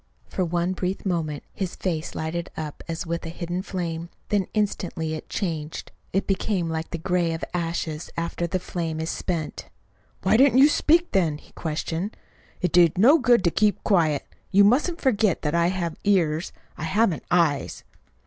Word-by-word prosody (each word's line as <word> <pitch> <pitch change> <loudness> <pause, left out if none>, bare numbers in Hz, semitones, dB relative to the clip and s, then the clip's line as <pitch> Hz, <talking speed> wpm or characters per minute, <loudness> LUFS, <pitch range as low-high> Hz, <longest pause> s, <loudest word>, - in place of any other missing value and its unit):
For 185 - -1
one 175 +1 0
brief 185 +2 -3
moment 160 -6 -1
his 185 -3 -3
face 165 -4 -3
lighted 170 +2 -3
up 155 -2 -5
as 165 +1 -3
with 170 0 -3
a 165 - -5
hidden 175 +1 -3
flame; 170 -3 -4 0.2
then 200 -3 +1
instantly 180 -6 -1
it 155 - -7
changed. 160 -5 -4 0.2
It 195 - 0
became 195 -2 0
like 160 0 -3
the 170 - -4
gray 175 0 0
of 160 - -7
ashes 165 -2 -2
after 170 +1 -2
the 185 +2 -1
flame 165 -3 -4
is 160 +1 -2
spent. 165 -5 -4 0.5
"Why - - +4
didn't 265 0 +5
you 280 +3 +8
speak, 335 +3 +3
then?" 165 -6 +2
he - - -19
questioned. 165 +5 -3 0.4
"It 180 -3 +1
did 175 -2 +5
no 270 - +7
good 240 -6 +4
to 170 - +3
keep 210 +2 +2
quiet. 160 -8 +2 0.2
You 200 +1 +6
mustn't 290 - +3
forget 215 - +2
that 150 0 0
I 170 0 +3
have 175 -3 -2
ears 170 -5 +2 0.2
if - - -20
I - - -4
haven't 190 -1 +1
eyes." 165 -5 +1
175 Hz, 175 wpm, -25 LUFS, 160-195 Hz, 0.5 s, you